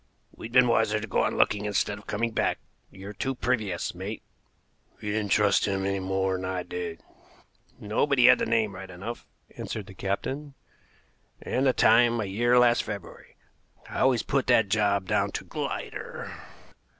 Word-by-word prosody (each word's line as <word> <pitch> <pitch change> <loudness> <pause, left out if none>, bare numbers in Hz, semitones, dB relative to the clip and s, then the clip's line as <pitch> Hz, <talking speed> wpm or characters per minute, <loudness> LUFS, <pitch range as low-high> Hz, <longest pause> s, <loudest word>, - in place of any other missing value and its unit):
"We'd 115 - -9
been 125 0 +6
wiser 110 -2 +2
to 110 - -5
go 100 - 0
on - - 0
looking 105 0 +2
instead 100 0 -1
of 105 - -19
coming 115 +3 -1
back. - - 0 0.3
You're 100 +2 -10
too 130 +7 -3
previous, 110 -8 -1
mate." 95 +5 -6 0.8
"You 105 - -4
didn't 105 -2 -2
trust 105 -2 +3
him 95 -1 -1
any 100 0 0
more'n 95 0 -1
I 95 -1 -2
did." 90 -2 -6 0.8
"No; 105 +7 0
but 140 -1 +1
he 125 - +6
had - - +7
the - - -1
name 110 -3 +1
right 95 0 -9
enough," 100 +7 -7 0.3
answered 105 -3 -5
the 95 - -12
captain, 135 +10 -4 0.8
"and 135 +2 0
the 130 - +4
time 120 +1 +4
a 105 - -1
year 120 +6 +2
last 120 -1 +5
February. 100 -4 -8 0.5
I - - -5
always 130 -4 +3
put 140 -3 0
that 115 -5 +4
job 100 -2 +1
down - - 0
to - - -4
Glider. - - -5
105 Hz, 175 wpm, -27 LUFS, 95-120 Hz, 0.8 s, had